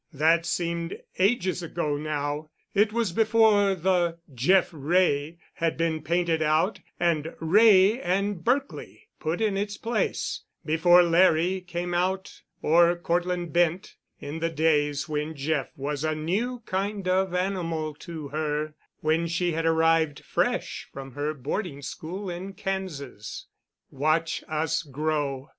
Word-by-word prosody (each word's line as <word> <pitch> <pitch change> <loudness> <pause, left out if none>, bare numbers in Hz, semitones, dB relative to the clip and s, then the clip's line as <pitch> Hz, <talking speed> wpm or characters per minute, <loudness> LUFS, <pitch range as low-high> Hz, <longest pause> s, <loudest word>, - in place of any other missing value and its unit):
That 165 +3 +3
seemed 170 -1 -2 0.2
ages 190 -2 +2
ago 165 -3 -2
now. 150 0 -3 0.2
It 210 +1 +3
was 230 -4 0
before 215 -1 +4
the 175 -1 +1 0.2
"Jeff 175 +10 +3
Wray" 155 0 +1 0.2
had 165 -1 -1
been 165 -1 0
painted 170 +1 0
out 155 +6 +2 0.2
and 165 -2 0
"Wray 200 +5 +5
and 200 +1 0
Berkely" 275 +3 -2
put 165 +5 -2
in 215 -3 +1
its 205 0 -3
place, 230 +1 -2 0.2
before 175 +3 +5
Larry 175 +1 +3
came 175 0 -4
out, 185 +2 -1 0.2
or 170 +2 +5
Cortland 175 -1 -1
Bent, 175 +1 +1 0.2
in 150 +3 -6
the 165 +1 0
days 150 -2 +1
when 155 +1 -3
Jeff 145 0 -1
was 145 +1 -3
a 155 0 0
new 220 +11 -2
kind 195 0 -2
of 185 0 +1
animal 170 -5 -1
to 160 -4 -7
her, 150 0 -2 0.3
when 160 +2 +1
she 175 +1 0
had 165 0 -1
arrived 160 -2 +2
fresh - - -1
from 135 0 -8
her 145 +3 -2
boarding 145 - -4
school 185 +9 -6
in 185 +2 -5
Kansas. 160 - -5 0.5
"Watch 155 +4 0
Us 160 +1 0
Grow!" 145 -2 -2
165 Hz, 135 wpm, -26 LUFS, 155-185 Hz, 0.5 s, Wray